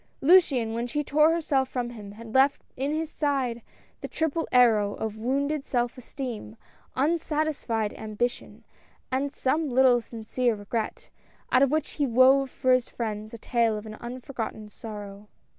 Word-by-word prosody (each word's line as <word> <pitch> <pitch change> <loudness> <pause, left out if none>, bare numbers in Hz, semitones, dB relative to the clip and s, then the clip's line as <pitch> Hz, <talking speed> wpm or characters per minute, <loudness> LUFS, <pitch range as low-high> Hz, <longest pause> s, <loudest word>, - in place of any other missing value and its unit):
Luciane, 275 -8 +4
when 235 +1 -2
she 295 +4 -1
tore 300 +3 +4
herself 290 -6 +1
from 245 -2 -3
him, 205 -4 -9
had 225 +1 -11
left 270 +2 +3
in 275 +3 -1
his 315 +1 -1
side 265 -5 -1 0.4
the - - -4
triple 320 +1 -1
arrow 220 -5 +4
of 220 -1 -4
wounded 275 +6 -1
self 240 -3 -1
esteem, 250 -4 -7 0.4
un 310 +6 +2
satisfied 295 -9 -1
ambition, 220 +3 -4 0.5
and 270 +2 0
some 295 +3 0
little 250 -1 +5
sincere 230 +1 -1
regret, 215 +2 -4 0.4
out 255 - +5
of 275 - +5
which 305 +1 -1
he 290 -2 -1
wove 260 +3 +5
for 255 0 0
his 255 -1 +1
friends 215 -2 -4
a 230 - -8
tale 230 -1 +1
of 210 - -8
an 215 - -7
unforgotten 235 -3 -6
sorrow. 205 -2 -9
250 Hz, 160 wpm, -27 LUFS, 225-280 Hz, 0.5 s, little